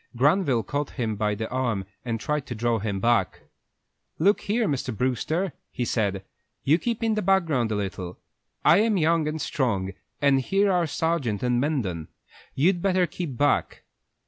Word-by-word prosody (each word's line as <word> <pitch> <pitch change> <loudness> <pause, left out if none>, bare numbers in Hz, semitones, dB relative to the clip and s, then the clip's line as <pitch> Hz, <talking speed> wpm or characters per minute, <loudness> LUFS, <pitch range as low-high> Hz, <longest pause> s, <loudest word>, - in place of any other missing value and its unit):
Granville 140 - +3
caught 145 +7 -2
him 115 -4 -1
by 105 0 0
the 110 +2 -3
arm 120 -7 -1 0.2
and 115 -2 -2
tried 150 +2 -2
to 120 - -5
draw 115 +1 0
him 100 -1 -2
back. 115 -3 +1 0.8
"Look 200 +6 +3
here, 215 +2 0
Mr. 135 - -2
Brewster," 150 +8 0 0.2
he 125 - -3
said, 100 -5 -1 0.4
"you 155 +5 +4
keep 235 +1 -2
in 225 -1 +2
the 215 - 0
background 165 - +2
a - - 0
little. 95 -3 -4 0.5
I - - +7
am 215 -1 +2
young 165 -1 +2
and 155 +1 -2
strong, 100 -11 -1 0.3
and 140 -2 +4
here 195 +8 +2
are 175 -2 +2
Sargent 150 -11 -1
and 125 -1 +2
Mendon. 105 - -1 0.5
You'd 175 +5 +2
better 185 -1 +3
keep 155 -5 -5
back." 145 0 +1
135 Hz, 170 wpm, -25 LUFS, 110-170 Hz, 0.8 s, I